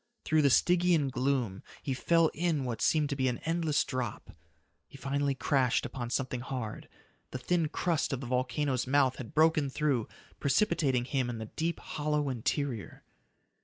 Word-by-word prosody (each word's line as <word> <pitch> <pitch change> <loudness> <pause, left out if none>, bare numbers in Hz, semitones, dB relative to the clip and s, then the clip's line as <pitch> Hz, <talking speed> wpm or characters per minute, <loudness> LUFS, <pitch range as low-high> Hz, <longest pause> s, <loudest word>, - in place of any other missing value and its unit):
Through 155 0 +3
the 140 - +4
Stygian 175 0 +3
gloom 125 -6 -1 0.2
he 135 - -1
fell 165 +5 +3
in 160 -3 0
what 120 -3 -4
seemed 150 -2 +2
to - - 0
be 130 -1 +1
an 125 -2 0
endless 165 -2 +1
drop. 130 -4 -4 0.6
He - - -13
finally 140 0 -1
crashed 130 -3 +1
upon 120 -3 -5
something 130 0 -2
hard. 125 -3 -5 0.4
The - - -5
thin 165 +5 0
crust 165 0 0
of 135 - -2
the 135 - -6
volcano's 125 +1 -1
mouth 135 -1 +3
had 120 -4 -8
broken 155 -2 +4
through, 135 -5 0 0.3
precipitating 140 -5 +2
him 130 -2 -1
into 110 -2 -4
the - - -15
deep, 165 +1 -1
hollow 150 -1 -1
interior. 125 - -3
135 Hz, 165 wpm, -30 LUFS, 125-155 Hz, 0.6 s, the